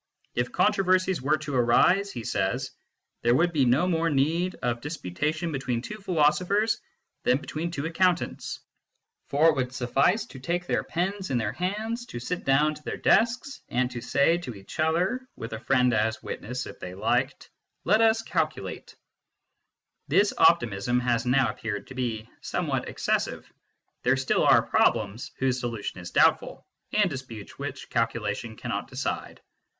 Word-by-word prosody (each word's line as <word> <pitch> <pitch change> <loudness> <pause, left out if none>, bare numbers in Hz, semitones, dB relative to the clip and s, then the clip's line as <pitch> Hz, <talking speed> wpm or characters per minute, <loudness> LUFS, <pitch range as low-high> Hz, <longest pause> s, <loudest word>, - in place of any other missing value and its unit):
" - - -41
If 125 - -4
controversies 185 -5 +2
were 150 +4 +2
to 150 -1 -6
arise," 180 +11 +4
he 120 - -6
says, 115 +7 -1 0.3
" - - -55
there 120 +1 +3
would 175 +4 +2
be 140 -4 +3
no 130 +9 +3
more 165 -2 +1
need 165 +6 +1
of 120 -1 -1
dis 150 +4 -5
putation 155 - -2
between 130 -4 -2
two 215 +8 -7
philosophers 180 +5 +2 0.4
than 125 +1 +3
between 155 +3 -4
two 150 -3 -4
accountants. 175 +1 0 0.7
For 155 +4 +4
it 160 - +2
would 130 -2 -1
suffice 135 - +2
to 130 - -11
take 175 +7 -2
their - - 0
pens 190 +3 -2
in 130 - +1
their 110 -3 -1
hands, 220 - -3
to 120 - -6
sit 175 +9 -4
down 150 +3 +3
to 150 - -13
their - - -4
desks, 245 +5 +2
and 125 +1 0
to 120 -1 -6
say 140 +7 +2
to 125 -10 -7
each 100 +9 -11
other 180 +11 +1
(with 115 0 -7
a 110 - -4
friend 125 +1 +2
as 110 +1 0
witness, 125 +3 -5
if - - -10
they 90 0 -7
liked), 100 - -1 0.3
Let 215 +5 +4
us 225 0 +4
calculate/ - - -3 1.1
This 205 0 +3
optimism 120 -8 +3
has 120 -1 0
now 125 -3 +3
appeared 105 -2 -5
to - - -11
be 115 -4 -3
somewhat - - -2
excessive; - - -2 0.5
there 130 +2 +3
still 130 -1 +1
are - - +6
problems 110 +5 +1
whose 130 -1 +1
solution 115 -6 -4
is 85 -1 -7
doubtful, - - +2 0.3
and 210 -1 +3
disputes 130 - -8
which - - -5
calculation - - -1
cannot - - -4
decide. - - -4
140 Hz, 165 wpm, -27 LUFS, 120-180 Hz, 1.1 s, are